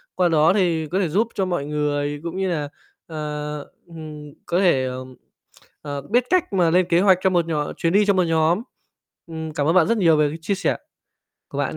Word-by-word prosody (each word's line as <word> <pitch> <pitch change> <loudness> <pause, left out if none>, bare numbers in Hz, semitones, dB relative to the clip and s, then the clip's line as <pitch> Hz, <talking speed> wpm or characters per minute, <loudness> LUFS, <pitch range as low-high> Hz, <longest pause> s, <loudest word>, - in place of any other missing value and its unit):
Qua 180 -1 +2
đó 160 +2 +4
thì 170 -6 +1
có 185 +5 -1
thể 180 -5 0
giúp 215 +8 +1
cho 195 - 0
mọi 175 -6 -2
người, 145 -1 -2
cũng 170 +2 -5
như 190 -1 0
là, 150 -4 -2 0.4
ờ, 150 -1 -5 0.3
ừm, 155 -3 -10
có 175 - 0
thể, 135 -9 +3 0.9
ờ, 145 -1 -5
biết 235 - +1
cách 365 - +1
mà 175 -3 +3
lên 180 +1 +3
kế 170 - +4
hoạch 190 -2 +5
cho 190 - +3
một 175 -2 +1
nhóm 150 -3 -2
chuyến 165 +1 0
đi 205 0 +4
cho 200 - +3
một 185 -1 +2
nhóm. 165 +4 +2 0.7
Ừm, 160 -1 -6
cảm 145 0 -1
ơn 165 - +2
bạn 170 -3 +5
rất 230 - +1
nhiều 165 -5 +4
về 150 -1 +3
cái 160 - -6
chia 200 +4 -1
sẻ - - -1 0.7
của - - -7
bạn - - -2
165 Hz, 220 wpm, -22 LUFS, 150-185 Hz, 0.9 s, hoạch